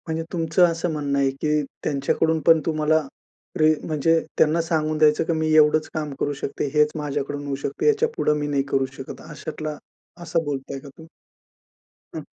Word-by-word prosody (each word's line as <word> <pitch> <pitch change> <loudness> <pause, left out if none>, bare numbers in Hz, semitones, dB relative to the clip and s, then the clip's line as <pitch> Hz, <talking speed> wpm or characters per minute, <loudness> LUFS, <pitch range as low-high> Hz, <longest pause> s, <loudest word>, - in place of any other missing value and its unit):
म्हणजे 160 0 -2
तुमचं 170 +1 +3
असं 170 0 -1
म्हणणं 145 -2 -1
आहे 135 -1 +3
की 150 0 +2 0.2
त्यांच्याकडून 150 +3 +1
पण 165 -1 +6
तुम्हाला, 155 -1 +2 0.6
रे 155 0 +5
म्हणजे 165 +1 +2 0.2
त्यांना 160 +2 +3
सांगून 155 -2 -1
द्यायचं 150 -1 +4
की 165 - -1
मी 160 -1 0
एवढंच 155 0 +4
काम 150 -2 -3
करू 145 - 0
शकते. 135 +1 -4
हेच 150 0 +4
माझ्याकडून 145 -1 -3
होऊ 140 -1 -2
शकते. 140 - -1
याच्यापुढे 445 - +2
मी 145 - -2
नाही 140 -2 0
करू 135 -1 +3
शकत. 135 - -8
अशातला, 155 0 -6 0.5
असं 165 0 0
बोलताय 135 -1 -4
का 140 - -12
तु 160 - -12 1.1
हं. - - -5
155 Hz, 170 wpm, -23 LUFS, 145-160 Hz, 1.1 s, पण